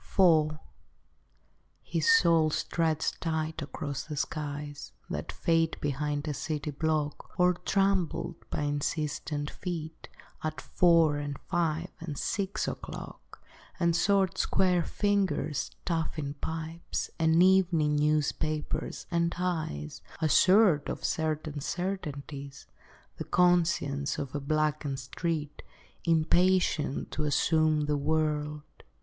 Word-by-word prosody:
IV 160 -5 +5 1.3
His 460 - +1
soul 165 - +5
stretched 160 0 -1
tight 160 -1 -2
across 145 -1 -4
the 150 -2 -6
skies 145 -1 -4 0.2
That - - -3
fade 165 -1 +1
behind 145 +1 -2
a 150 - -1
city 150 +1 -3
block, 155 +3 -2
Or 180 0 +5
trampled 190 -3 0
by - - -2
insistent 145 0 -2
feet 160 -3 -6 0.3
At 155 0 -3
four 165 -4 +4
and 145 -1 -4
five 170 0 0
and 155 -4 -6
six 200 +4 -1
o'clock; - - -8 0.4
And 170 -2 +2
short 195 0 +2
square 180 -2 +2
fingers 190 -9 0 0.2
stuffing 160 -4 -2
pipes, 160 +2 -4
And 165 +1 +5
evening 175 -5 +4
newspapers, 150 0 -1
and 170 0 +1
eyes 160 - -3 0.2
Assured 175 +1 +5
of - - -4
certain 155 -1 -1
certainties, 145 -6 -5 0.5
The - - -5
conscience 170 -5 +2
of 135 -1 -4
a 145 - -1
blackened 150 -1 0
street 150 +3 -3 0.4
Impatient 165 -2 +2
to 155 - -2
assume 155 +1 +2
the 150 0 0
world. 150 0 0
155 Hz, 105 wpm, -29 LUFS, 150-170 Hz, 1.3 s, IV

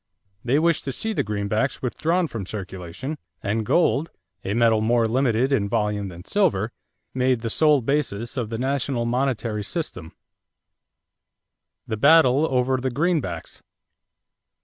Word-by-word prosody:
They 125 +4 +2
wished 165 0 +2
to 135 - -2
see 220 - -2
the - - 0
greenbacks 105 +6 -1
withdrawn 165 +8 0
from 115 - -6
circulation 95 - -6 0.2
and 110 +3 0
gold 160 +4 +2 0.3
a 100 - -2
metal 115 -2 +3
more 115 +1 +2
limited 125 +1 +1
in 100 -7 +1
volume 105 -2 -1
than 90 0 -10
silver 145 - +1 0.4
made 130 -2 +1
the 115 -1 -3
sole 150 0 +4
basis 120 -5 -1
of 120 -5 -2
the 115 - -3
national 130 -1 -1
monetary 120 -4 -1
system. 100 - -3 1.7
=The 110 - -3
Battle 145 +2 +5
over 130 0 +2
the 130 +1 -1
Greenbacks. 140 - -2
120 Hz, 135 wpm, -23 LUFS, 105-140 Hz, 1.7 s, Battle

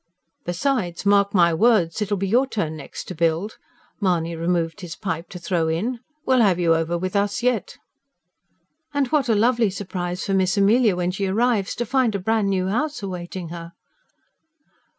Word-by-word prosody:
"Besides, 180 -1 -1
mark 200 0 +4
my 170 -4 +4
words, 210 -2 +2
it'll 205 0 0
be 195 +1 -1
your 245 +7 +3
turn 165 -11 -2
next 150 - -8
to - - -7
build," 165 +6 -1 0.4
Mahony 170 -4 0
removed 170 +2 -1
his 175 -3 -7
pipe 175 -4 -4
to 180 - -8
throw 170 -2 -1
in. 215 +10 -1 0.3
"We'll 260 -2 +4
have 195 -5 +4
you 170 -2 +3
over 165 +1 0
with 185 +3 -4
us 200 +3 0
yet." 250 -2 0 1.2
"And 285 -1 +2
what 280 -4 +1
a 225 - +4
lovely 230 0 +3
surprise 185 -2 -4
for 200 - -1
Miss 190 +1 +2
Amelia 210 +1 +4
when 180 0 -1
she 195 +1 -2
arrives, 215 0 +1
to 240 - -2
find 245 -2 +1
a - - -1
bran' 220 +2 +1
new 185 -1 0
house 285 +5 -2
awaiting 180 -2 -5
her." 170 0 -8
195 Hz, 175 wpm, -23 LUFS, 175-220 Hz, 1.2 s, mark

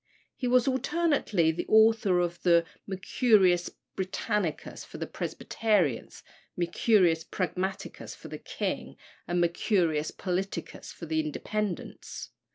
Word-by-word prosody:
He 250 - -2
was 250 0 +4
alternately 265 - +2
the 160 - -4
author 220 -4 +5
of 175 0 -2
the 170 -1 +4 0.2
Mercurius 190 -2 +3 0.3
Britannicus 190 -2 -2
for - - -10
the - - -3
Presbyterians, 190 - -1 0.3
Mercurius 175 -1 +3
Pragmaticus 185 +2 -4
for - - -11
the - - -7
king, - - -4 0.3
and 175 0 0
Mercurius 170 -3 +1
Politicus 190 +1 -4
for 170 - -9
the 160 0 0
Independents. 185 +5 -4
185 Hz, 110 wpm, -29 LUFS, 170-215 Hz, 0.3 s, author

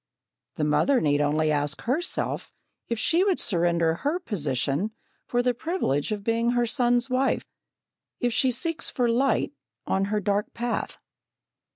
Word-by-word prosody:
The 155 - -2
mother 250 - +3
need 145 -4 +2
only 155 +1 +2
ask 145 0 -1
herself 285 +9 -1 0.4
if 235 - -2
she 335 +10 +3
would 390 -3 +2
surrender 170 -3 +1
her 295 +6 0
position 160 - -1 0.3
for 245 0 +1
the 250 0 +2
privilege 240 - -1
of 205 -1 -3
being 230 +2 +1
her 240 0 +2
son's 245 +1 +2
wife, 260 +1 +1 0.7
if 245 -1 0
she 260 - +3
seeks 325 +7 -1
for 245 -2 0
light 255 +4 +1 0.3
on 195 0 +1
her 210 +1 0
dark 205 +1 -1
path. 240 0 -2
230 Hz, 150 wpm, -26 LUFS, 170-255 Hz, 0.7 s, mother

